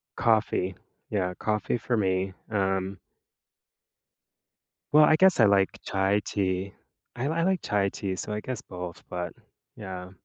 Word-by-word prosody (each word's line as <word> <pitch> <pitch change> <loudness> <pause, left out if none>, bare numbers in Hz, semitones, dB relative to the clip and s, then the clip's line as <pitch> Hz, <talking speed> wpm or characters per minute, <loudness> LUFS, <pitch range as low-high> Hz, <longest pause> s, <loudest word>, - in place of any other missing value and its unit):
Coffee. 105 -4 +2 0.3
Yeah. 90 -3 0
Coffee 105 +4 -1
for 120 +1 -1
me. 95 -1 0 0.2
Um 95 -2 0 1.9
Well, 150 +1 +8
I 155 - +5
guess 185 -3 +5
I 115 - +8
like 100 -2 +4
chai 95 +1 +1
tea. 95 -1 -1 0.4
I 125 +3 -2
li 155 - 0
I 165 - +1
like 185 0 +1
chai 100 -2 +1
tea, 95 -1 -3
so 105 - -5
I 105 - -2
guess 125 -1 -5
both, 90 -2 -8
but 90 -1 -4 0.4
yeah. 95 -3 -7
100 Hz, 145 wpm, -27 LUFS, 95-110 Hz, 1.9 s, Well